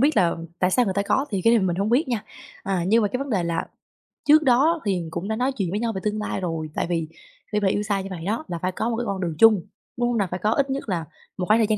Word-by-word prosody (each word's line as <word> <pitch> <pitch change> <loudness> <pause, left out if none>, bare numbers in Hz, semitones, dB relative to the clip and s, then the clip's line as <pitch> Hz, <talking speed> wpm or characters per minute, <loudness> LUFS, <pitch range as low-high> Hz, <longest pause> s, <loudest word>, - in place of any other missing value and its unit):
biết 285 -1 +3
là 175 -4 +3 0.2
tại 180 - +2
sao 245 +5 +3
người 190 - -1
ta 200 - +1
có? 265 +7 +1
Thì 195 -2 -1
cái 230 - +6
này 220 - +3
mình 175 -2 0
hông 200 +4 0
biết 265 +4 +2
nha. 235 -4 -2 0.4
À, 190 -3 -1
nhưng 225 +3 +4
mà 205 - +2
cái 250 +5 -2
vấn 275 -1 -4
đề 190 -5 +1
là 170 -1 -1 0.6
trước 305 +1 +7
đó 290 +6 +3
thì 200 - +2
mình 170 -2 -3
cũng 170 +4 -4
đã 220 - -1
nói 255 +3 +1
chuyện 200 -9 -2
với 205 - -1
nhau 230 -1 0
về 190 - -4
tương 210 0 -1
lai 210 - -3
rồi, 165 -3 -3
tại - - -1
vì 165 -2 -1 0.4
khi 210 - +1
mà 200 - +1
yêu 205 +2 +1
xa 205 -2 0
như 190 - -6
vậy 170 -3 -6
đó 225 +9 -1
là 170 - -4
phải 185 - 0
có 220 +5 -2
một 230 - -1
cái 240 - -2
con 195 -2 -3
đường 170 -3 -2
chung, 220 -5 +7 0.4
đúng 240 - +1
hông 240 - 0
nè? 200 - +1
Phải 180 - -3
có 215 - +3
ít 275 +3 +1
nhất 270 -3 -3
là 170 -4 -1 0.3
một 180 - -1
khoảng 215 +2 +5
thời 220 - +3
gian 215 - +1
210 Hz, 325 wpm, -24 LUFS, 185-235 Hz, 0.6 s, trước